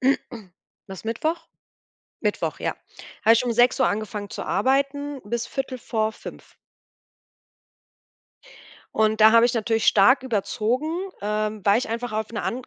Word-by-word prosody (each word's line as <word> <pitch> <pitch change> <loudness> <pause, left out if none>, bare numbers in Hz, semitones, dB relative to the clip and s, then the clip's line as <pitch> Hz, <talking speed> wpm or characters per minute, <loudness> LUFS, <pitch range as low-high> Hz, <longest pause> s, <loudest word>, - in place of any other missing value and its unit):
War 225 -7 -1 0.4
es 190 - -12
Mittwoch? 315 +9 -2 0.8
Mittwoch, - - -2
ja. - - -2 0.5
Habe 225 - +7
ich 230 +2 +1
um 240 - 0
6:00 245 +2 +4
angefangen 210 -1 -4
zu - - -6
arbeiten 275 +5 0
bis 230 +3 -3
4:45. 230 -5 -4 2.4
Und 220 0 +2
da 215 +1 +8
habe 230 +1 +6
ich 245 - -2
natürlich 225 0 0
stark 250 +7 +5
überzogen, 245 +4 -1 0.3
ähm, 210 0 -2
weil 200 +2 +4
ich - - -4
einfach 230 +1 -4
auf 215 0 -2
'ne 230 - -3
and 250 +1 -4
230 Hz, 135 wpm, -24 LUFS, 215-255 Hz, 2.4 s, da